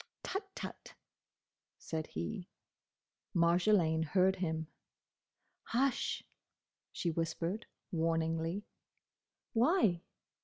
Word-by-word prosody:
"Tut, 390 +2 -2
tut!" - - -7 0.8
said 160 -1 -3
he. 85 - -4 0.9
Marjolaine 170 -1 +4
heard 185 +4 +3
him. 160 -3 -1 1.0
"Hush!" 260 +2 +1 0.7
she 170 - -1
whispered, 165 +6 -2 0.2
warningly. 165 +2 0 0.9
"Why?" 235 - +4
170 Hz, 70 wpm, -35 LUFS, 160-205 Hz, 1.0 s, Marjolaine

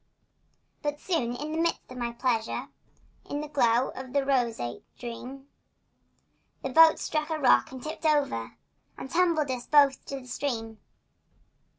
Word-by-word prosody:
But 295 0 -2
soon, 255 -11 -1
in 300 +4 -5
the 320 - -2
midst 335 -5 -1
of - - -8
my 240 -1 -2
pleasure, 235 -2 -1 0.6
In 285 - -2
the 300 - -5
glow 250 -4 +2
of 260 0 -9
a 280 -1 +2
roseate 235 - -1
dream, 255 +3 -8 1.2
The 270 - -2
boat 320 +4 +7
struck 305 0 -2
a 320 - -1
rock 265 -4 +4
and 260 -1 -9
tipped 310 +1 -3
over 280 - 0 0.4
And 265 - -8
tumbled 330 -5 +2
us 250 -1 -4
both 280 -3 +4
in 275 -1 -5
the - - -15
stream. 225 -4 -3
270 Hz, 155 wpm, -28 LUFS, 245-300 Hz, 1.2 s, boat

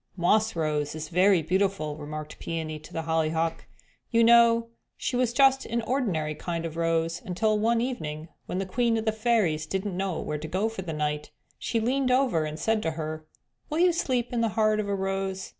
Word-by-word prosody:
"Moss 215 +5 +2
Rose 150 -2 -1
is 155 0 -6
very 185 0 +4
beautiful," 185 -3 0
remarked 155 0 -7
Peony 160 -2 -4
to 155 - -14
the 165 - -3
Hollyhock; 160 0 0 0.4
"you 230 -1 +4
know 230 0 +5 0.3
she 255 - -2
was 245 -1 +2
just 270 +1 +4
an 235 0 -1
ordinary 200 - -1
kind 170 +1 -4
of 165 -1 -5
a - - -5
rose 165 0 0
until 210 +3 0
one 230 +2 +2
evening, 160 -11 -4 0.2
when - - -3
the 195 - -1
Queen 230 +4 +1
of 220 - -2
the 220 - +3
Fairies 215 -9 +1
didn't 190 +2 -2
know 190 -2 -2
just - - -5
where 150 0 -3
to 155 - -6
go 190 +7 0
for 225 -4 -6
the 175 -3 -5
night, 150 -1 -2 0.3
she 230 - -1
leaned 255 +3 +1
over 250 - +2
and 155 0 -5
said 220 +5 +1
to 165 - -1
her, 155 0 -5 0.4
'Will 305 - -2
you 355 +1 +5
sleep 250 -7 -1
in 235 - +1
the 230 - +2
heart 215 -1 +3
of 205 -1 -2
a 200 - +1
rose?' 195 0 -2
190 Hz, 210 wpm, -27 LUFS, 160-230 Hz, 0.4 s, know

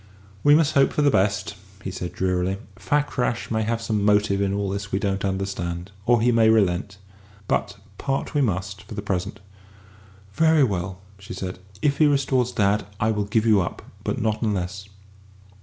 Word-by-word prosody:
"We 145 0 +7
must 155 -1 +3
hope 140 -2 +4
for 150 - +1
the 145 - +5
best," 100 0 +1 0.3
he 95 - -4
said 90 -1 -5
drearily; 95 +1 0 0.2
"Fakrash 130 -5 -1
may 110 0 +1
have 115 +1 -1
some 105 -3 0
motive 105 -1 +3
in 100 -1 +1
all 100 0 -1
this 100 +1 -4
we - - +1
don't 100 -2 -1
understand. 95 -2 -3 0.2
Or 120 -1 +5
he 125 - +4
may 115 -1 +4
relent. 100 -2 +2 0.5
But 100 -2 -1 0.2
part 135 +2 -2
we 145 - +2
must, 100 -4 -1
for 105 - -10
the 105 - -4
present." 100 +1 -3 0.9
"Very 160 +3 +4
well," 95 -5 -1 0.2
she 100 -1 -8
said. 95 -1 -5 0.2
"If 140 -1 +2
he 155 - +6
restores 135 -3 +1
dad, 105 -1 +1
I 110 +1 +2
will 105 -1 -1
give 110 +2 +1
you 105 -3 +5
up. 85 - -5 0.2
But - - -2
not 110 0 -1
unless." 100 -2 -2
105 Hz, 180 wpm, -24 LUFS, 95-115 Hz, 0.9 s, We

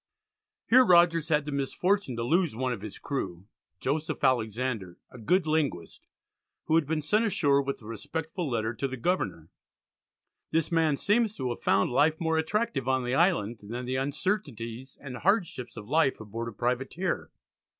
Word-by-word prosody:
Here 255 +2 +7
Rogers 170 -5 +4
had 150 -2 +2
the 150 - -4
misfortune 140 +3 0
to 115 - -2
lose 165 +1 +1
one 130 +1 -1
of 110 - -7
his 105 -1 -7
crew, 95 -10 -4 0.3
Joseph 155 +2 -2
Alexander 115 -5 0
"a 125 - -11
good 180 - +2
linguist," 145 - -2 0.6
who - - -2
had 160 -3 +3
been 155 0 -1
sent 210 +9 +2
ashore 145 -10 +3
with 140 -4 -4
a - - -13
respectful 160 - -4
letter 115 -2 -1
to 135 - -2
the 130 0 -6
Governor. 120 - -2 1.0
This 160 +1 0
man 160 -3 +2
seems 215 +3 +2
to 130 -2 -2
have 120 - -6
found 100 +4 +2
life 150 +5 +3
more 160 -1 +1
attractive 160 - -1
on 130 -1 +2
the 125 +1 -2
island 135 - +2
than 120 +5 -6
the 130 +1 -1
uncertainties 135 - -3
and 130 -3 -7
hardships 170 - 0
of 105 - -8
life 150 0 +2
aboard 115 +2 -5
a - - -4
privateer. 125 - -2
140 Hz, 170 wpm, -28 LUFS, 120-165 Hz, 1.0 s, Here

